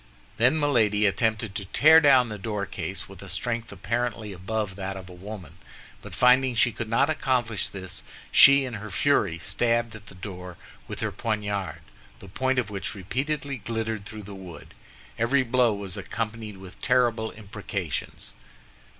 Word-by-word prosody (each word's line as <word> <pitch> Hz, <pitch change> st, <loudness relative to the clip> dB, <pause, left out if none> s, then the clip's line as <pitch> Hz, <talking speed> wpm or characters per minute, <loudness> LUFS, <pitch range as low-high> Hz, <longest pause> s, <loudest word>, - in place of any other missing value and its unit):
Then 125 Hz, +7 st, +4 dB
Milady 110 Hz, -8 st, +3 dB
attempted 110 Hz, 0 st, +1 dB
to 100 Hz, -1 st, -3 dB
tear 155 Hz, +11 st, +7 dB
down 135 Hz, -5 st, +5 dB
the 105 Hz, -1 st, -6 dB
doorcase, 100 Hz, -2 st, -4 dB
with 95 Hz, -2 st, -12 dB
a 100 Hz, -, -9 dB
strength 115 Hz, +4 st, -3 dB
apparently 110 Hz, -4 st, -2 dB
above 95 Hz, +2 st, -3 dB
that 95 Hz, 0 st, -4 dB
of 95 Hz, -1 st, -9 dB
a -, -, -10 dB
woman; 90 Hz, -3 st, -9 dB, 0.4 s
but -, -, -9 dB
finding 125 Hz, 0 st, +5 dB
she 120 Hz, +1 st, +4 dB
could 115 Hz, 0 st, -5 dB
not 115 Hz, +5 st, +3 dB
accomplish 125 Hz, -9 st, 0 dB
this, 95 Hz, -2 st, -7 dB, 0.3 s
she 140 Hz, 0 st, +8 dB
in 125 Hz, -, -6 dB
her 105 Hz, 0 st, -6 dB
fury 100 Hz, -, +2 dB
stabbed 115 Hz, +5 st, 0 dB
at 105 Hz, -1 st, -12 dB
the -, -, -12 dB
door 90 Hz, -2 st, -8 dB, 0.3 s
with -, -, -6 dB
her -, -, -1 dB
poniard, 105 Hz, -4 st, -2 dB, 0.4 s
the -, -, -13 dB
point 130 Hz, +7 st, 0 dB
of 115 Hz, -5 st, 0 dB
which 100 Hz, +2 st, -4 dB
repeatedly 135 Hz, -, -2 dB
glittered 110 Hz, -1 st, -3 dB
through 110 Hz, 0 st, -8 dB
the 100 Hz, +1 st, -9 dB
wood. 95 Hz, -3 st, -10 dB, 0.5 s
Every 130 Hz, +4 st, +3 dB
blow 125 Hz, -1 st, +3 dB
was 100 Hz, -3 st, -5 dB
accompanied 110 Hz, -2 st, -4 dB
with 95 Hz, -1 st, -13 dB
terrible 120 Hz, -4 st, +2 dB
imprecations. 100 Hz, -6 st, -5 dB
110 Hz, 160 wpm, -26 LUFS, 100-120 Hz, 0.5 s, she